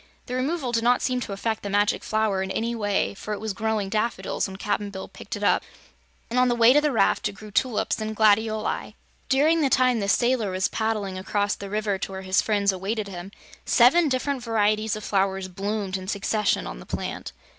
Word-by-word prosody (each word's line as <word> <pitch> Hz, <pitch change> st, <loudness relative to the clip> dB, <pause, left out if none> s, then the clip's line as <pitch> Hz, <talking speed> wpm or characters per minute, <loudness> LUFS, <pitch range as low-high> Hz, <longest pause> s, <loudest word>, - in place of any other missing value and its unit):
The 250 Hz, -, -6 dB
removal 265 Hz, +1 st, -1 dB
did 230 Hz, -1 st, 0 dB
not 245 Hz, +1 st, +3 dB
seem 255 Hz, -1 st, 0 dB
to 235 Hz, -, -5 dB
affect 220 Hz, +2 st, -2 dB
the 200 Hz, -, -5 dB
Magic 205 Hz, +1 st, +1 dB
Flower 215 Hz, -3 st, 0 dB
in 190 Hz, -, -3 dB
any 230 Hz, +4 st, -1 dB
way, 205 Hz, -4 st, 0 dB
for 210 Hz, +1 st, -5 dB
it -, -, -8 dB
was 220 Hz, -1 st, -3 dB
growing 215 Hz, 0 st, -1 dB
daffodils 215 Hz, +2 st, -1 dB
when 190 Hz, 0 st, -8 dB
Cap'n 205 Hz, 0 st, -2 dB
Bill 190 Hz, -1 st, -7 dB
picked -, -, -8 dB
it -, -, -6 dB
up -, -, +3 dB, 0.7 s
and 245 Hz, +2 st, 0 dB
on 250 Hz, -, +4 dB
the 240 Hz, -, +2 dB
way 235 Hz, +1 st, +6 dB
to 295 Hz, -, +5 dB
the 300 Hz, -1 st, +1 dB
raft 225 Hz, -, +2 dB
it -, -, -9 dB
grew 210 Hz, +1 st, -12 dB
tulips 225 Hz, 0 st, 0 dB
and 215 Hz, 0 st, -3 dB
gladioli. 215 Hz, 0 st, +1 dB, 0.3 s
During 310 Hz, +5 st, +3 dB
the 280 Hz, -, +2 dB
time 255 Hz, -2 st, +3 dB
the 200 Hz, -1 st, -1 dB
sailor 240 Hz, -1 st, +2 dB
was 185 Hz, 0 st, 0 dB
paddling 210 Hz, -4 st, -2 dB
across 205 Hz, +2 st, 0 dB
the 200 Hz, -, -7 dB
river 210 Hz, -1 st, -1 dB
to 195 Hz, -, -4 dB
where 190 Hz, 0 st, -6 dB
his 185 Hz, 0 st, +2 dB
friends 205 Hz, -2 st, +2 dB
awaited 200 Hz, +3 st, -3 dB
him, 180 Hz, +1 st, -8 dB, 0.3 s
seven 295 Hz, +7 st, +5 dB
different 265 Hz, +1 st, -1 dB
varieties 215 Hz, -1 st, +1 dB
of 215 Hz, -, -7 dB
flowers 195 Hz, -1 st, 0 dB
bloomed 195 Hz, +1 st, -3 dB
in 185 Hz, 0 st, -8 dB
succession 205 Hz, +1 st, 0 dB
on -, -, -7 dB
the -, -, -12 dB
plant. -, -, -4 dB
215 Hz, 215 wpm, -25 LUFS, 200-235 Hz, 0.7 s, way